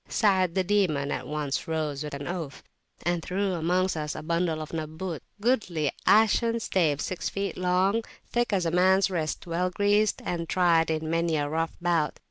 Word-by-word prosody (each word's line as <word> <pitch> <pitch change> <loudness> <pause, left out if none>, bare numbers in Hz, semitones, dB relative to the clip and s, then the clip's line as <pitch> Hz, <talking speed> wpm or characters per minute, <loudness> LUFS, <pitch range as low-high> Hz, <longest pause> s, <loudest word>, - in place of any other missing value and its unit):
Sa'ad 190 -5 +2
the 190 - +2
Demon 175 -8 +1
at - - -3
once 150 -2 -2
rose 155 -3 -2
with 150 -1 -5
an 140 0 -6
oath, 165 -6 -5 0.4
and 175 -1 0
threw 190 +3 -1
amongst 180 +2 +1
us 150 -1 -3
a 155 - -6
bundle 170 0 0
of 155 +1 -7
"Nabbut" 160 +1 -4 0.2
goodly 195 - +1 0.2
ashen 225 +2 +4
staves 160 -9 +1
six 185 - -3
feet 200 0 -3
long, 185 +5 +1 0.2
thick 240 -1 -1
as 190 -4 +1
a 165 - +1
man's 190 +2 +4
wrist, 160 -4 -2
well 175 +2 0
greased, 205 +2 +2
and 170 -2 -3
tried 170 -3 +3
in 160 0 -1
many 165 0 +1
a 145 -1 0
rough 165 +2 -2
bout. 170 -4 0
175 Hz, 180 wpm, -27 LUFS, 155-190 Hz, 0.4 s, ashen